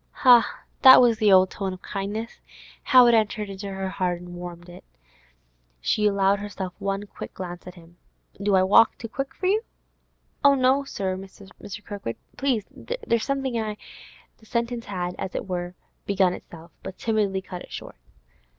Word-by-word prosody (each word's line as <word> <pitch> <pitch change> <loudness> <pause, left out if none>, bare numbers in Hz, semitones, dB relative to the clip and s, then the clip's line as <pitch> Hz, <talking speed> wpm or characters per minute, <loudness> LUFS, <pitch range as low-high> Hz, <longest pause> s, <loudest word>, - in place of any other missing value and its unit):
Ha! 240 -4 +6 0.2
that 260 0 +10
was 235 -3 +4
the 210 -3 +4
old 185 -1 +6
tone 195 -2 -3
of 185 - -11
kindness! 210 +4 -5 0.4
How 255 -3 +7
it 240 - +5
entered 215 -2 +1
into 195 +1 -6
her 190 -1 -4
blood 180 -1 +1
and 175 0 -11
warmed 175 0 -8
it! 175 0 -12 1.0
She 210 - +1
allowed 200 0 +2
herself 195 -3 -6
one 195 +1 -2
quick - - -10
glance 175 -1 -7
at 180 - -9
him. 170 0 -17 0.4
'Do 200 -1 +2
I 185 - +4
walk 205 +4 +5
too 230 - -7
quick 270 +4 -5
for 375 - -5
you?' 410 +4 +3 0.8
'Oh 280 0 +6
no, 265 +1 +3
sir. 190 -7 -3
Mr. 195 +1 -11
Kirkwood, 200 - -5 0.2
please, 255 -7 0
there's 235 - -2
something 270 -4 -1
I—' 215 -1 -4 0.6
The 220 - -21
sentence 235 0 -2
had, 180 -3 -3
as 190 -2 -5
it - - -4
were, 180 -1 -4 0.3
begun 190 -2 +2
itself, 165 -1 -11
but 185 - -8
timidity 205 -4 0
cut 180 -1 -8
it - - -13
short. - - -8
200 Hz, 175 wpm, -25 LUFS, 185-230 Hz, 1.0 s, that